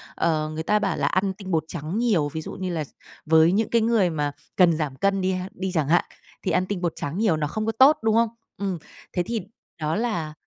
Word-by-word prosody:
Ờ, 155 -2 +1
người 160 +1 -3
ta 210 +5 +2
bảo 195 -4 -1
là - - +1
ăn 190 +1 +1
tinh 190 -1 -8
bột 160 -1 +2
trắng 165 +3 -4
nhiều, 205 -11 +2
ví 160 - -3
dụ - - -7
như 185 -1 -4
là 155 -2 -1
x - - -11 0.4
với 160 +2 +5
những 215 +3 +1
cái 230 -1 +3
người 220 -5 +3
mà 145 -2 -1 0.2
cần 170 -4 +5
giảm 145 -4 -2
cân 195 +4 +1
đi 185 +1 +1
ha 185 +1 -3
đi 190 0 -3
chẳng 155 -4 +1
hạn, 175 - +4 0.4
thì 185 - -1
ăn 180 +1 +2
tinh 185 -1 -3
bột 170 -2 0
trắng 150 +6 -4
nhiều 205 -8 +2
nó 150 - -1
không 215 +8 -3
có 225 - +1
tốt, 265 +7 +6
đúng 220 0 +3
không? 230 0 +4 0.3
Ừm, 195 -3 -2 0.4
thế 180 - +1
thì 230 +2 -2 0.4
đó 155 +1 0
là 175 -10 -2
185 Hz, 260 wpm, -24 LUFS, 160-210 Hz, 0.4 s, tốt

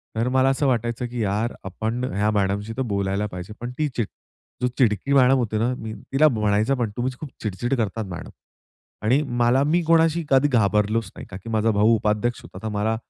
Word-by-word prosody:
तर 115 +2 0
मला 130 +1 +3
असं 135 +1 +1
वाटायचं 120 -1 0
की 120 -1 -4
"यार, 105 +4 -1
आपण 110 +6 -3
ह्या 105 +2 +1
मॅडमशी 105 +1 -1
तर - - 0
बोलायला 100 +1 0
पाहिजे." 90 +1 -8
पण 120 +1 -5
ती 155 - +1
चिड 115 -4 0 0.5
जो 125 - +2
चिडकी 120 +1 +2
मॅडम 135 -1 +5
होती 110 -4 -1
ना, 120 +4 +1
मी 110 -3 -6 0.2
तिला 145 +3 +5
म्हणायचं 105 +3 +1
पण 120 -3 0
"तुम्हीच 125 +1 -2
खूप 155 - -7
चिड-चिड 110 +4 -2
करतात 110 -1 -2
मॅडम" 85 - -7 0.8
आणि 130 +7 +4 0.2
मला 125 +3 +4
मी 170 +3 +3
कोणाशी 165 0 +3
कधी 135 +1 +5
घाबरलोच 105 -3 +1
नाही, - - -8
का 95 - -7
की 100 +4 -10
माझा 110 0 +2
भाऊ 110 +2 +4
उपाध्यक्ष 105 +2 0
होता - - -11
तर 110 - -2
मला 105 +2 0
115 Hz, 200 wpm, -23 LUFS, 105-130 Hz, 0.8 s, मॅडम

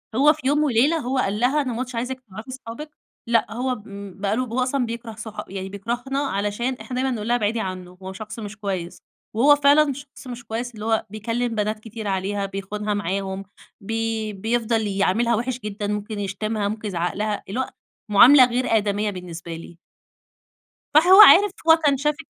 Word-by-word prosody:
هو 295 +4 +6
في 300 -4 -6
يوم 295 +2 +3
وليلة 285 +4 +3
هو 265 -3 -2
قال 210 -4 0
لها: 265 +5 +2
"أنا 255 -4 -3
ما 230 - -4
عُدتش 255 -1 -4
عايزِك 250 +2 -3
تعرفي 215 +7 -10
اصحابِك." 265 +3 -8 0.4
لأ 230 -2 +2
هو 250 +2 -1
بم 200 -2 -10
بقى 200 +1 0
له 255 +2 0
ب 230 - -9
هو 255 - 0
أصلًا 255 0 0
بيكره 235 0 -6
صح 220 -1 -7
يعني 190 0 -6
بيكرهنا 240 +7 -3
علشان 220 -1 -1
إحنا 255 - -6
دايمًا 260 +1 0
نقول 220 -3 -4
لها 240 - +3
ابعدي 225 0 0
عنّه 185 -2 -6
هو 190 - -6
شخص 215 +3 -8
مش 210 -1 -7
كويس. 190 -4 -4 0.3
وهو 275 +7 +6
فعلًا 290 0 +4
شخص 280 0 -12
مش 245 -1 -8
كويس 235 +3 -4
اللي 210 0 -7
هو 220 -1 +1
بيكلّم 230 +4 -2
بنات 215 0 -1
كتير 220 0 -7
عليها، 195 +1 -1
بيخونها 200 +2 -4
معاهم، 195 0 -3 0.4
بي 225 0 -2
بيفضل 225 +2 0
يعاملها 200 +4 +1
وِحِش 245 +3 -2
جدًا، 210 -2 -4
ممكن 210 +1 -3
يشتمها، 205 +2 -2
ممكن 215 +1 -4
يزعّق 175 -3 -2
لها، 210 0 -2
اللي 215 +6 -3
هو 260 - -1 0.4
مُعاملة 255 +6 +8
غير 250 +1 -1
آدَميّة 205 0 0
بالنسبة 175 -3 -7
لي. 165 +1 -11 1.2
فهو 360 +7 +8
عارف 410 -1 +8 0.2
هو 320 - +10
كان 280 -2 +4
شاف 300 +2 0
225 Hz, 190 wpm, -23 LUFS, 205-255 Hz, 1.2 s, هو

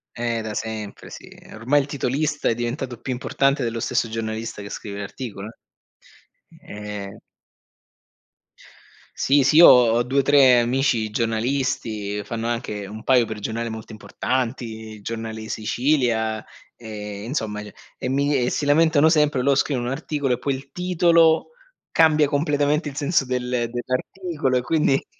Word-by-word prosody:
Eh 115 -1 -2
da 110 -1 -5
sempre 110 -1 -6
sì, - - -11 0.3
ormai 125 +7 +2
il 135 - -6
titolista 145 +2 -1
è - - +3
diventato 120 +1 -4
più 130 - -4
importante 135 +2 0
dello 115 -1 -2
stesso 115 0 0
giornalista 110 -1 -4
che 100 - -8
scrive 100 0 -7
l'articolo, 100 0 -7
eh. 115 - -12 1.5
Ehm 100 - -10 2.0
Sì, 140 +1 +3
sì, 140 +4 +3
io 170 - +10
ho 120 -2 +6
2,3 130 0 +5
amici 120 -3 +1
giornalisti, 115 -3 -1
fanno 115 +1 -4
anche 105 -4 -3
un 110 +2 -9
paio 125 -2 +4
per 110 -1 -5
giornale 115 +2 -3
molto 110 0 -8
importanti, 115 -1 -4
il 105 - -15
Giornale 115 0 -5
di 110 0 -8
Sicilia, 115 -2 0 0.3
e 105 -3 -7
insomma, 110 -4 -3
ceh, 105 - -11 0.2
e - - -3
mi 140 +2 +1
e 125 -1 +1
si - - -2
lamentano 160 +1 +4
sempre 150 -5 +2
lo 140 +1 +4
scrivono 135 -2 0
un 125 - -2
articolo 145 -3 -2
e 120 - -2
poi 140 +1 -1
il 135 +1 -11
titolo, 170 - +3 0.4
cambia 155 -2 +4
completamente 145 +1 0
il 140 - -11
senso 145 0 +1
del 125 -1 -2 0.2
dell'articolo 130 +3 -2
e - - 0
quindi 145 -2 +1
125 Hz, 150 wpm, -23 LUFS, 110-140 Hz, 2.0 s, io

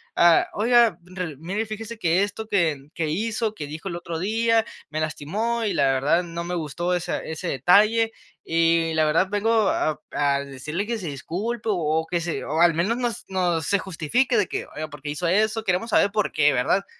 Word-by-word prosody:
"Ah, 170 -1 +5
oiga, 235 -3 +4
ril 180 -5 -6
mire, 195 +7 -3
fíjese 220 +1 -7
que 175 +2 +2
esto 215 +2 -5
que 160 -9 0
que 165 -4 -2
hizo, 220 +5 -1
que 150 -9 -6
dijo 155 +6 -6
el 170 - -4
otro 170 -1 -5
día, 225 +4 +2 0.2
me 155 +1 -3
lastimó 210 +10 -2
y 205 - 0
la 150 -5 +2
verdad 140 +6 +2
no 170 0 -5
me 180 +1 -3
gustó 175 +2 -2
esa 175 0 -2
ese 160 +2 -5
detalle 215 - +4 0.3
y 165 0 +2
la 160 0 +2
verdad, 155 +5 +2
vengo 215 +1 +2
a 155 -1 0
a 140 -1 +1
decirle 150 +9 -4
que 235 - -1
se 190 -6 -6
disculpe 200 - -4
o 160 -4 0
que 175 -1 0
se 165 0 -3
o 160 +3 0
al 175 -1 +6
menos 175 +8 +1
no 245 -1 0 0.2
no 180 -3 0
se 200 +7 +1
justifique", 195 - 0
de 205 - +2
que, - - -4
oiga, 155 +1 -4
¿por 145 -2 -11
qué 145 - -5
hizo 150 +4 -2
eso? 215 +5 +2
Queremos 185 +6 0
saber 205 -1 +3
por 210 -2 0
qué, 150 -1 +3
¿verdad? 135 +10 +1
175 Hz, 205 wpm, -24 LUFS, 160-215 Hz, 0.3 s, al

